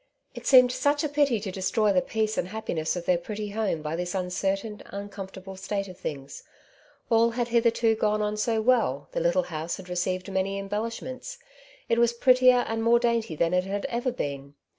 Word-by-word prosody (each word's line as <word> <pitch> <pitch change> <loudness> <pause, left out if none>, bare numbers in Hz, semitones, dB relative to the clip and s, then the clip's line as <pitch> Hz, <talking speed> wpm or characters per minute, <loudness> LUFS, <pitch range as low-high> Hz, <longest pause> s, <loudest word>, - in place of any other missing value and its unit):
It - - -8
seemed 255 -2 +7
such 290 +3 +1
a - - +1
pity 285 -5 +2
to 195 -2 -4
destroy 200 +3 +1
the 180 - +3
peace 220 +1 -1
and 175 - -1
happiness 185 -6 -2
of 175 -1 -5
their 180 -2 +2
pretty 210 +3 -5
home 205 -7 -2
by 155 +1 -2
this 175 +2 -3
uncertiain, 195 +3 -2
uncomfortable 195 -1 -8
state 195 +1 -3
of 185 - -10
things; 140 -5 -6 0.7
all 230 0 +5
had 240 0 -2
hitherto 230 -1 +3
gone 215 -1 +1
on 210 0 -1
so 220 +1 0
well, 215 - +2
the - - -2
little 170 +2 +2
house 160 +2 -3
had 185 -1 -11
received 185 +2 -2
many 190 +1 -1
embellishments; 230 - -5 0.5
it 230 - +2
was 235 0 +3
prettier 255 0 +5
and 225 0 -2
more 230 +1 +5
dainty 235 -7 0
than 165 +3 +1
it 180 0 +2
had 200 +1 -3
ever 240 +2 -1
been. 140 - -5
205 Hz, 190 wpm, -26 LUFS, 180-235 Hz, 0.7 s, seemed